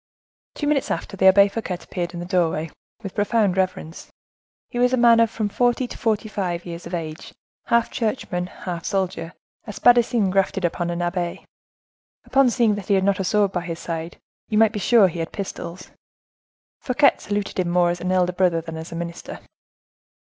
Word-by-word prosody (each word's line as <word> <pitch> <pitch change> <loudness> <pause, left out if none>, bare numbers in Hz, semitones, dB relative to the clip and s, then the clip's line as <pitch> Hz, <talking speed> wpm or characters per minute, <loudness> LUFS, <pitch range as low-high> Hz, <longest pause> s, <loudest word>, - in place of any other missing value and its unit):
Two 295 - -3
minutes 290 -2 +1
after, - - -3
the 190 0 +4
Abbe 200 +1 +7
Fouquet 200 -3 -4
appeared 175 0 -5
in - - -5
the 175 - -5
doorway, 165 -4 0 0.3
with 195 - -6
profound 205 -2 +1
reverence. 185 -3 -3 0.6
He 245 - -3
was 250 +1 +3
a - - +3
man 235 -1 +6
of 230 -1 +4
from 215 -1 -2
forty 245 +4 +1
to - - -9
forty 220 -2 -1
five 185 -5 -3
years 170 -1 -7
of 175 - -4
age, 155 -2 -7 0.3
half 235 0 +2
churchman, 210 -6 -2
half 175 -2 -6
soldier,—a 185 +1 -4
spadassin 235 -2 +3
grafted 195 -1 +1
upon 175 0 -1
an 175 0 -2
abbe; 175 0 -3 0.8
upon 275 -2 +4
seeing 235 -3 +2
that 205 -2 -6
he 200 - +3
had 190 - +2
not 200 0 +1
a - - 0
sword 205 0 +2
by 180 - -2
his 170 -1 -5
side, 165 0 -5 0.3
you 210 - -1
might 220 0 +4
be 210 - -3
sure 210 +1 +5
he 170 -1 -6
had 165 - -3
pistols. 185 -3 -7 0.9
Fouquet 275 +2 +3
saluted 205 -2 -3
him 180 -1 0
more 175 0 +3
as 175 - -5
elder 180 0 +1
brother 180 -2 +2
than 165 0 -7
as 160 +1 -8
a - - -6
minister. 170 0 -6
190 Hz, 190 wpm, -22 LUFS, 175-215 Hz, 0.9 s, Abbe